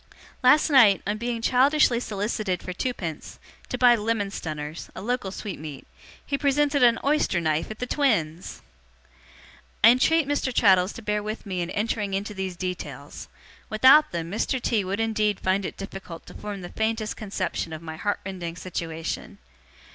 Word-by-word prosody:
Last 290 Hz, +4 st, +5 dB
night, 225 Hz, -8 st, +6 dB
on 210 Hz, +1 st, -2 dB
being 235 Hz, -1 st, -3 dB
childishly 260 Hz, -1 st, +4 dB
solicited 205 Hz, -4 st, -2 dB
for 180 Hz, -, -5 dB
twopence, 180 Hz, -, -4 dB, 0.3 s
to -, -, -2 dB
buy 245 Hz, -1 st, +6 dB
'lemon 210 Hz, -2 st, -1 dB
stunners' 155 Hz, -3 st, -6 dB
a -, -, -6 dB
local 245 Hz, -3 st, -1 dB
sweetmeat 155 Hz, -8 st, -7 dB, 0.4 s
he 280 Hz, -1 st, -2 dB
presented 285 Hz, 0 st, +2 dB
an 235 Hz, -2 st, +6 dB
oyster 285 Hz, -, +2 dB
knife 155 Hz, -1 st, 0 dB
at 215 Hz, -, -7 dB
the 250 Hz, -, -3 dB
twins! 205 Hz, -, -1 dB, 1.2 s
'I -, -, +10 dB
entreat 275 Hz, +5 st, +4 dB
Mr. 285 Hz, -2 st, 0 dB
Traddles 190 Hz, -5 st, +4 dB
to 230 Hz, -, -10 dB
bear 210 Hz, 0 st, 0 dB
with 215 Hz, +2 st, -5 dB
me 185 Hz, -3 st, -3 dB
in 170 Hz, -, -3 dB
entering 210 Hz, -2 st, -1 dB
into 205 Hz, +2 st, -3 dB
these 190 Hz, -2 st, -4 dB
details. 180 Hz, 0 st, -6 dB, 0.4 s
Without 260 Hz, +8 st, +6 dB
them, 170 Hz, 0 st, -4 dB
Mr. 225 Hz, +5 st, -1 dB
T. 225 Hz, -4 st, 0 dB
would 195 Hz, +3 st, -3 dB
indeed 215 Hz, -2 st, 0 dB
find 190 Hz, +1 st, 0 dB
it -, -, -6 dB
difficult 195 Hz, -4 st, -8 dB
to -, -, -12 dB
form 205 Hz, -2 st, -6 dB
the 175 Hz, -, -7 dB
faintest 220 Hz, 0 st, -2 dB
conception 200 Hz, -5 st, -3 dB
of 160 Hz, +1 st, -7 dB
my 160 Hz, -1 st, -6 dB
heart 205 Hz, +5 st, -2 dB
rending 180 Hz, -3 st, -5 dB
situation. 165 Hz, -3 st, -5 dB
210 Hz, 165 wpm, -25 LUFS, 180-240 Hz, 1.2 s, I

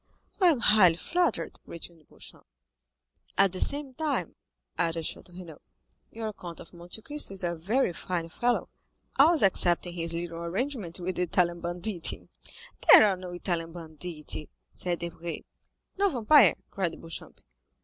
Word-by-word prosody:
"I 365 Hz, -, +6 dB
am 300 Hz, -8 st, +3 dB
highly 200 Hz, -7 st, +6 dB
flattered," 350 Hz, -, -1 dB
returned 170 Hz, -2 st, -9 dB
Beauchamp. -, -, -11 dB, 0.9 s
"At 195 Hz, -1 st, +5 dB
the 185 Hz, -, -5 dB
same 285 Hz, -2 st, -1 dB
time," 305 Hz, +1 st, -2 dB, 0.4 s
added 165 Hz, -1 st, 0 dB
Château -, -, -5 dB
Renaud, 170 Hz, -5 st, -11 dB, 0.5 s
"your 220 Hz, -1 st, -5 dB
Count 170 Hz, -4 st, -9 dB
of 165 Hz, -, -13 dB
Monte 175 Hz, +5 st, -9 dB
Cristo 295 Hz, -9 st, -3 dB
is 190 Hz, -, -1 dB
a 170 Hz, -1 st, -1 dB
very 190 Hz, +5 st, 0 dB
fine 170 Hz, 0 st, -3 dB
fellow, 240 Hz, +8 st, 0 dB, 0.5 s
always 315 Hz, 0 st, +6 dB
excepting 175 Hz, -2 st, +3 dB
his 165 Hz, -1 st, 0 dB
little 170 Hz, 0 st, -5 dB
arrangements 190 Hz, +1 st, -3 dB
with 180 Hz, +1 st, -4 dB
the -, -, 0 dB
Italian 175 Hz, 0 st, +1 dB
banditti." 175 Hz, +1 st, +1 dB, 0.6 s
"There -, -, +10 dB
are 195 Hz, -, +1 dB
no 185 Hz, 0 st, -8 dB
Italian 175 Hz, -2 st, -3 dB
banditti," 160 Hz, -2 st, -4 dB, 0.2 s
said 175 Hz, -1 st, -2 dB
Debray. 170 Hz, 0 st, -6 dB, 0.6 s
"No 400 Hz, 0 st, +4 dB
vampire," 250 Hz, -, +5 dB, 0.2 s
cried 185 Hz, -4 st, -3 dB
Beauchamp. 165 Hz, -1 st, -7 dB
180 Hz, 145 wpm, -28 LUFS, 170-220 Hz, 0.9 s, There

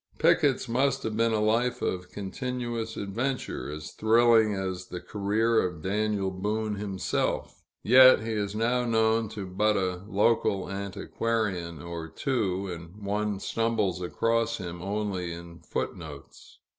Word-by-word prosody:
Picket's -, -, +3 dB
must 135 Hz, +3 st, +1 dB
have 110 Hz, -1 st, -2 dB
been 115 Hz, +1 st, +2 dB
a 110 Hz, -, +1 dB
life 115 Hz, +4 st, +1 dB
of 90 Hz, 0 st, -2 dB
continuous 115 Hz, +3 st, -4 dB
adventure, 120 Hz, -, -3 dB
as 75 Hz, +1 st, -7 dB
thrilling 110 Hz, -1 st, +4 dB
as 95 Hz, -1 st, -4 dB
the 90 Hz, -, -6 dB
career 110 Hz, +4 st, +1 dB
of 90 Hz, -4 st, -4 dB
Daniel 100 Hz, 0 st, 0 dB
Boone 105 Hz, +3 st, -2 dB
himself; 100 Hz, -2 st, -2 dB, 0.2 s
yet 130 Hz, 0 st, +8 dB
he 115 Hz, -, -3 dB
is 105 Hz, -2 st, -2 dB
now 120 Hz, +3 st, +1 dB
known 110 Hz, -1 st, +2 dB
to 105 Hz, -3 st, -6 dB
but 105 Hz, +3 st, +1 dB
a 90 Hz, -2 st, -1 dB
local 100 Hz, -2 st, +1 dB
antiquarian 100 Hz, -4 st, -2 dB
or 85 Hz, -1 st, -5 dB
two, 100 Hz, 0 st, -1 dB
and 90 Hz, +3 st, -8 dB
one 105 Hz, 0 st, -1 dB
stumbles 110 Hz, -5 st, 0 dB
across 115 Hz, +5 st, 0 dB
him 85 Hz, -3 st, -6 dB
only 100 Hz, -3 st, -2 dB
in 85 Hz, 0 st, -9 dB
foot 80 Hz, -, -3 dB
notes. 75 Hz, -5 st, -11 dB
105 Hz, 140 wpm, -28 LUFS, 95-115 Hz, 0.2 s, yet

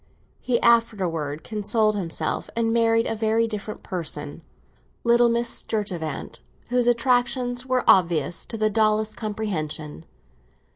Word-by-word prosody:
He 245 Hz, -2 st, 0 dB
afterwards 180 Hz, -11 st, +1 dB
consoled 215 Hz, 0 st, +1 dB
himself, 165 Hz, -5 st, -3 dB
and 225 Hz, -1 st, +1 dB
married 230 Hz, 0 st, +3 dB
a -, -, -1 dB
very 225 Hz, +1 st, +1 dB
different 215 Hz, -1 st, -6 dB
person, 155 Hz, -4 st, -4 dB, 0.6 s
little 235 Hz, 0 st, +4 dB
Miss 235 Hz, +1 st, +1 dB
Sturtevant, 185 Hz, -11 st, -4 dB, 0.3 s
whose 245 Hz, 0 st, +2 dB
attractions 245 Hz, +1 st, +1 dB
were 255 Hz, -1 st, +1 dB
obvious 170 Hz, -3 st, +3 dB
to 225 Hz, -, -3 dB
the 215 Hz, 0 st, +1 dB
dullest 215 Hz, 0 st, +1 dB
comprehension. 160 Hz, -, -4 dB
215 Hz, 115 wpm, -24 LUFS, 175-235 Hz, 0.6 s, little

